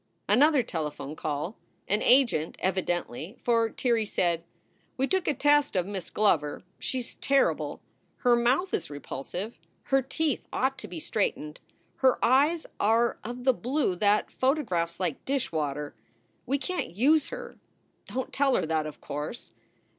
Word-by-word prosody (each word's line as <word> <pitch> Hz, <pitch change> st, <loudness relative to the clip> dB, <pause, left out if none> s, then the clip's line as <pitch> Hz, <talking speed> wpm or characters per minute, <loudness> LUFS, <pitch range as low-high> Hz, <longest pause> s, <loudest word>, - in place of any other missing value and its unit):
Another 290 Hz, 0 st, +5 dB
telephone 150 Hz, -6 st, -4 dB
call 155 Hz, +6 st, -3 dB, 0.3 s
an 210 Hz, +2 st, +1 dB
agent, 240 Hz, -, +3 dB
evidently, 175 Hz, -, -2 dB
for 230 Hz, -1 st, +2 dB
Tirrey 230 Hz, -2 st, 0 dB
said: 170 Hz, -4 st, 0 dB, 0.3 s
" -, -, -39 dB
We 265 Hz, -, +2 dB
took 375 Hz, +4 st, 0 dB
a 300 Hz, -, +3 dB
test 290 Hz, 0 st, +3 dB
of 180 Hz, -2 st, +2 dB
Miss 195 Hz, -3 st, -5 dB
Glover. 160 Hz, -9 st, +1 dB, 0.2 s
She 260 Hz, -, -2 dB
s 235 Hz, -, -8 dB
terrible! 275 Hz, 0 st, +1 dB, 0.4 s
Her 245 Hz, -2 st, +4 dB
mouth 255 Hz, +11 st, +2 dB
is -, -, -1 dB
repulsive, 150 Hz, -, -6 dB, 0.2 s
her 270 Hz, 0 st, +2 dB
teeth 285 Hz, +2 st, -2 dB
ought 265 Hz, +1 st, 0 dB
to 210 Hz, -, -6 dB
be 175 Hz, -3 st, -6 dB
straightened, 150 Hz, -4 st, -2 dB, 0.4 s
her 260 Hz, -1 st, +4 dB
eyes 290 Hz, +7 st, +3 dB
are 230 Hz, +3 st, +2 dB
of 245 Hz, +2 st, -6 dB
the 260 Hz, 0 st, +5 dB
blue 250 Hz, -2 st, 0 dB
that 205 Hz, +3 st, +2 dB
photographs 210 Hz, -, 0 dB
like 180 Hz, -5 st, -2 dB
dishwater. 150 Hz, -, -2 dB, 0.5 s
We 275 Hz, +3 st, +2 dB
can 365 Hz, +5 st, -3 dB
t -, -, -5 dB
use 290 Hz, -, +4 dB
her. -, -, -8 dB, 0.5 s
Don 260 Hz, 0 st, -2 dB
t -, -, -24 dB
tell 275 Hz, -2 st, +2 dB
her -, -, +1 dB
that, 155 Hz, -1 st, 0 dB
of 150 Hz, -, -10 dB
course. 150 Hz, +11 st, -6 dB
230 Hz, 155 wpm, -28 LUFS, 170-270 Hz, 0.5 s, Another